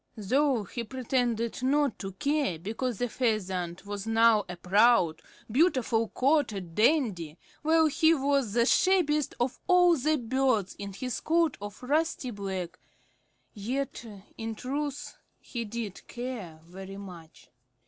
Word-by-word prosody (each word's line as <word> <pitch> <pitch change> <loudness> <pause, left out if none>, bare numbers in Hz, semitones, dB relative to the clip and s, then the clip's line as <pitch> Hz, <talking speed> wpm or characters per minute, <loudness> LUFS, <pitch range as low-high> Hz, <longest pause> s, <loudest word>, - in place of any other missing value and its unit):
Though 255 +3 +1
he 235 +5 -5
pretended 240 -1 -1
not 280 0 +1
to 195 -1 -6
care 285 - 0
because 220 +7 -3
the 245 - -1
Pheasant 190 -8 -2
was 205 +1 -5
now 225 -2 +4
a 180 - -5
proud, 180 -3 +3 0.3
beautifully 250 -6 +2
coated 245 - +1
dandy, 210 - +1 0.2
while 320 +1 +4
he 315 +2 +4
was 275 -6 0
the 235 0 +3
shabbiest 305 -2 +2
of 245 +1 -1
all 355 -1 +6
the 305 +2 +1
birds 245 -5 0
in 200 -1 -6
his 250 +4 -4
coat 330 -2 +2
of 205 +3 -8
rusty 290 -1 0
black, 190 -4 -5 0.7
yet 245 +6 -3 0.4
in 225 0 -4
truth 285 +4 -4 0.2
he 235 -2 -6
did 215 -2 -6
care 230 -11 -6
very 190 +3 -9
much. 165 -11 -12
235 Hz, 130 wpm, -28 LUFS, 200-275 Hz, 0.7 s, all